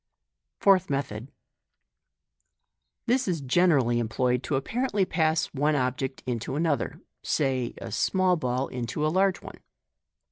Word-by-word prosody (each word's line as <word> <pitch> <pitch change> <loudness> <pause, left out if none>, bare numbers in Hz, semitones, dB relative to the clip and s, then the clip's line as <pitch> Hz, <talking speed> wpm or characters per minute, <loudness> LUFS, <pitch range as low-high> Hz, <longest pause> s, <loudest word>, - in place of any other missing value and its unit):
Fourth 190 -2 +4
Method. 135 -3 -3 0.8
— - - -54
This 250 +1 +1
is 175 -4 0
generally 135 -4 +3
employed 125 +2 0
to 135 - -2
apparently 210 - 0
pass 160 -2 0
one 150 +2 +1
object 130 0 -2
into 120 +1 -3
another 155 -2 -1
— - - -58
say 130 -4 -1
a - - -7
small 185 -1 +2
ball 130 -4 -1
into 125 +4 -3
a - - +2
large 190 0 +2
one. - - -10
140 Hz, 135 wpm, -27 LUFS, 125-175 Hz, 0.8 s, Fourth